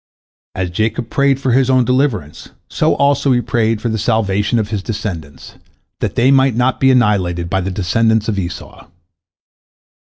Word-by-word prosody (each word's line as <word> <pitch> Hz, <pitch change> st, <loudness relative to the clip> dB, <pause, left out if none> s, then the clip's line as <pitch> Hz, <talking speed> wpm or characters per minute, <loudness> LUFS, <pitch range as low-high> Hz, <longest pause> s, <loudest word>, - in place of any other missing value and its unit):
As 90 Hz, -1 st, -3 dB
Jacob 110 Hz, +5 st, -2 dB
prayed 140 Hz, -1 st, +2 dB
for 135 Hz, -2 st, -1 dB
his 130 Hz, +1 st, +2 dB
own 130 Hz, -2 st, +3 dB
deliverance, 125 Hz, -, -1 dB, 0.2 s
so -, -, 0 dB
also 140 Hz, 0 st, +2 dB
he 120 Hz, -, +2 dB
prayed 115 Hz, -2 st, 0 dB
for 120 Hz, -, -3 dB
the 110 Hz, -1 st, -2 dB
salvation 105 Hz, 0 st, 0 dB
of 105 Hz, -2 st, -1 dB
his 105 Hz, -3 st, -3 dB
descendants, 95 Hz, -9 st, -7 dB, 0.4 s
that -, -, -3 dB
they 125 Hz, +3 st, +3 dB
might 135 Hz, -3 st, +3 dB
not 125 Hz, +2 st, 0 dB
be 135 Hz, -, +3 dB
annihilated 95 Hz, -9 st, +1 dB
by 95 Hz, -, +1 dB
the 95 Hz, -, -3 dB
descendants 110 Hz, +4 st, 0 dB
of 105 Hz, -3 st, -1 dB
Esau. 90 Hz, -3 st, -7 dB
110 Hz, 165 wpm, -16 LUFS, 95-130 Hz, 0.4 s, own